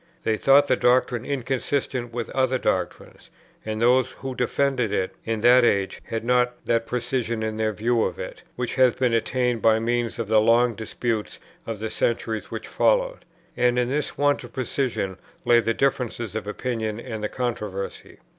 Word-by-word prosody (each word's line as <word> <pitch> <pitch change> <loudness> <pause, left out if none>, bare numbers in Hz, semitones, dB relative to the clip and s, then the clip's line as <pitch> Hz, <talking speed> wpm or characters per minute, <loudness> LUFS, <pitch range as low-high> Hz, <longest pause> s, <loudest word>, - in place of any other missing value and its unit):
They 110 - +1
thought 140 +5 +5
the - - +3
doctrine 125 -1 +2
inconsistent 130 -2 -2
with 120 -1 -4
other 130 -1 +1
doctrines; - - -3 0.3
and 110 0 -4
those 125 +2 +4
who 135 -1 -6
defended 125 -2 0
it 95 -2 -1
in 115 -1 -2
that 125 +2 +6
age 100 -4 +1
had 115 0 -4
not 125 0 +2
that 115 -1 +1
precision 120 -2 -2
in 110 0 -3
their 110 0 +1
view 115 +2 +1
of - - -3
it, - - -7
which 125 -1 -3
has 130 -2 +4
been 125 -3 +1
attained 120 0 0
by 110 -1 +5
means 120 +1 -1
of 115 - -3
the 110 0 +4
long 115 +2 +4
disputes 110 +1 -3 0.3
of 115 -2 -4
the 110 +1 -4
centuries 115 -2 -1
which - - -6
followed. - - +1 0.3
And 125 0 +2
in 125 0 +1
this 145 +3 -2
want 145 -1 +2
of 120 -1 -11
precision 125 -7 -2 0.3
lay 120 -1 +6
the 115 -1 0
difference 130 -4 0
of 110 -2 -4
opinion, 110 -1 -3
and 110 -2 -6
the 105 - -1
controversy. 105 -6 -4
120 Hz, 175 wpm, -24 LUFS, 110-125 Hz, 0.3 s, that